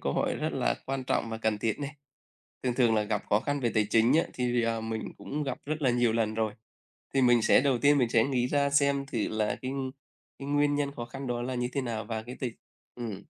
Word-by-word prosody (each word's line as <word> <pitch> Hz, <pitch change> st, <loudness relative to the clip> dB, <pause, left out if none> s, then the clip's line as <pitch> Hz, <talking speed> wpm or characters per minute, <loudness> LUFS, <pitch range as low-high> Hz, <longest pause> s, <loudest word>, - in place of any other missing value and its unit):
câu -, -, -1 dB
hỏi -, -, 0 dB
rất -, -, -2 dB
là 65 Hz, +1 st, +1 dB
quan 135 Hz, -1 st, -2 dB
trọng 115 Hz, -2 st, 0 dB
và 110 Hz, -, -4 dB
cần 110 Hz, -2 st, 0 dB
thiết 110 Hz, 0 st, -1 dB
này. 145 Hz, +1 st, -5 dB, 0.7 s
Thường 125 Hz, -2 st, 0 dB
thường 120 Hz, -3 st, +3 dB
là 105 Hz, -, +3 dB
gặp 105 Hz, -1 st, -1 dB
khó 105 Hz, -, +4 dB
khăn 145 Hz, +3 st, -2 dB
về 120 Hz, -3 st, +1 dB
tài 105 Hz, -1 st, +3 dB
chính 115 Hz, +4 st, +4 dB
á 165 Hz, -, +5 dB
thì, 120 Hz, -1 st, +1 dB
ờ, 115 Hz, 0 st, 0 dB
mình 110 Hz, -1 st, -4 dB
cũng 150 Hz, +2 st, -4 dB
gặp 135 Hz, -3 st, -3 dB
rất 155 Hz, +1 st, -3 dB
là 130 Hz, -, +4 dB
nhiều 120 Hz, -2 st, +2 dB
lần 110 Hz, -1 st, 0 dB
rồi. 110 Hz, -1 st, 0 dB, 0.6 s
Thì 135 Hz, -, +3 dB
mình 120 Hz, -2 st, +5 dB
sẽ 110 Hz, -, +5 dB
đầu 135 Hz, -3 st, +2 dB
tiên 145 Hz, +3 st, +4 dB
mình 125 Hz, -4 st, +2 dB
sẽ 115 Hz, -1 st, +4 dB
nghĩ 125 Hz, -3 st, +1 dB
ra 140 Hz, +1 st, +2 dB
xem 140 Hz, -1 st, +2 dB
thử 120 Hz, -6 st, -2 dB
là 110 Hz, -1 st, 0 dB
cái 130 Hz, -, -3 dB, 0.7 s
cái 140 Hz, -, -6 dB
nguyên 145 Hz, 0 st, +2 dB
nhân 145 Hz, -1 st, 0 dB
khó 120 Hz, -, -4 dB
khăn 135 Hz, +2 st, -7 dB
đó 120 Hz, -1 st, -1 dB
là 125 Hz, +1 st, -3 dB
như 125 Hz, 0 st, 0 dB
thế 140 Hz, -, 0 dB
nào 115 Hz, -4 st, -3 dB
và 110 Hz, +1 st, -3 dB
cái 125 Hz, +2 st, -8 dB
t -, -, -9 dB, 0.5 s
ừm. 115 Hz, -5 st, -6 dB
120 Hz, 255 wpm, -29 LUFS, 110-140 Hz, 0.7 s, á